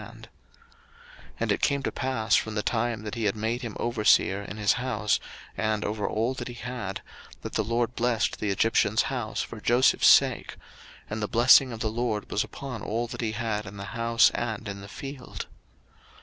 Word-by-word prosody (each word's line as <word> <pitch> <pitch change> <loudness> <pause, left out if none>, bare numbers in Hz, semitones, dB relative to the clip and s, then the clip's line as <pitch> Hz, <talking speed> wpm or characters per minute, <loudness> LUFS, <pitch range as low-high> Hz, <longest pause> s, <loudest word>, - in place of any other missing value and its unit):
01:039:005 - - -11 1.2
And - - +1
it - - 0
came 140 -1 +1
to - - -1
pass 130 -5 -1
from 110 -1 0
the 105 - -1
time 115 -1 -1
that 105 - -5
he 115 -3 -2
had 105 - +1
made 110 +3 -2
him 115 -5 -6
overseer 105 -4 +3
in 100 +1 -8
his 105 -2 +3
house, 110 -5 0 0.4
and 110 -1 -1
over 105 0 -2
all 115 +4 0
that 130 - -6
he 120 - -7
had, 120 -5 -5 0.4
that - - -6
the 110 - +1
LORD 115 +2 0
blessed 115 -4 0
the 105 - -1
Egyptian's 110 +1 +2
house 115 -4 -2
for 110 - -9
Joseph's 120 +4 +4
sake; - - +4 0.5
and 110 +1 -4
the 105 - -1
blessing 125 +3 +6
of 115 -1 -7
the 110 - 0
LORD 115 -2 -2
was 105 - +1
upon 130 -6 -7
all 115 +4 -2
that - - -6
he 110 -2 -1
had 105 -2 -2
in 100 +1 -9
the 100 - -6
house, 115 0 +4
and 110 -2 -3
in 100 -1 -6
the 100 - -9
field. 135 +4 -7
110 Hz, 195 wpm, -27 LUFS, 105-120 Hz, 1.2 s, blessing